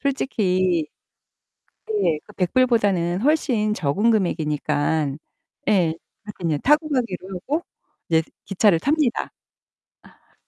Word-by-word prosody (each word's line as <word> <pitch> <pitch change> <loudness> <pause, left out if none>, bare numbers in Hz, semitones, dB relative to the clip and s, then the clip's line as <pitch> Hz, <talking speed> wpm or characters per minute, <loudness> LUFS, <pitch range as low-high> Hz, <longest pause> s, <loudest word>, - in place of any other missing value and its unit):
솔직히 185 - 0 1.2
예. 155 - +2
그 - - -16
$100보다는 195 -4 +1
훨씬 245 -7 +1
적은 195 +6 +1
금액이니까. 150 -6 0 0.6
예. - - +4 0.5
그러니깐 190 -6 -4
인제 150 - +1
타고 300 +3 +3
가기로 230 -9 -2
하고 285 - -2 0.5
이제 160 -1 +4 0.2
기차를 195 -3 +3
탑니다. 285 - 0 1.0
아. - - -33
195 Hz, 230 characters per minute, -22 LUFS, 170-250 Hz, 1.2 s, 예